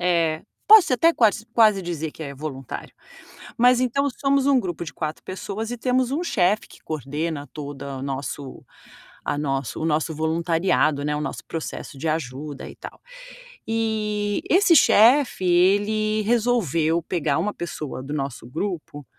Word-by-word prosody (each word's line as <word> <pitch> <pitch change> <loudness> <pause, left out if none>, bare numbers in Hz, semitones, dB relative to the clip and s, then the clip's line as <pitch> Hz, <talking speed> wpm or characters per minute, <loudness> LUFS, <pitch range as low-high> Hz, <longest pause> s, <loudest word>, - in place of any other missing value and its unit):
eh, 165 -3 +1 0.2
posso 425 -9 +8
até 330 +7 +4
quas 220 -5 +2
quase 215 -4 +5
dizer 160 -3 -4
que - - -16
é 140 -2 -6
voluntário. 135 -2 -7 0.7
Mas 245 +1 +5
então 255 +3 +1
somos 275 -1 +2
um 275 -2 +5
grupo 175 -6 -4
de - - -7
4 155 -1 -5
pessoas 200 +4 -5
e 245 - -4
temos 255 +1 +1
um 310 +5 -1
chefe 205 - +1
que - - -16
coordena 150 0 -4
todo 140 -2 -7
nosso 135 0 -5 0.6
a - - -1
nosso 135 -3 -2
o - - -1
nosso 160 0 0
voluntariado, 160 -1 +1
né, 150 0 0
o - - -3
nosso - - -4
processo 155 -3 -6
de 160 - -2
ajuda 145 -2 -4
e - - -11
tal. - - -10 0.7
E 215 -2 -1
esse 360 -1 +5
chefe, 245 -3 +5
ele 205 +4 +2
resolveu 205 - +1
pegar 155 -4 -1
uma 205 +6 -1
pessoa 155 -7 -6
do 140 +3 -5
nosso 135 -5 -4
grupo 155 0 -5
170 Hz, 155 wpm, -23 LUFS, 150-220 Hz, 0.7 s, posso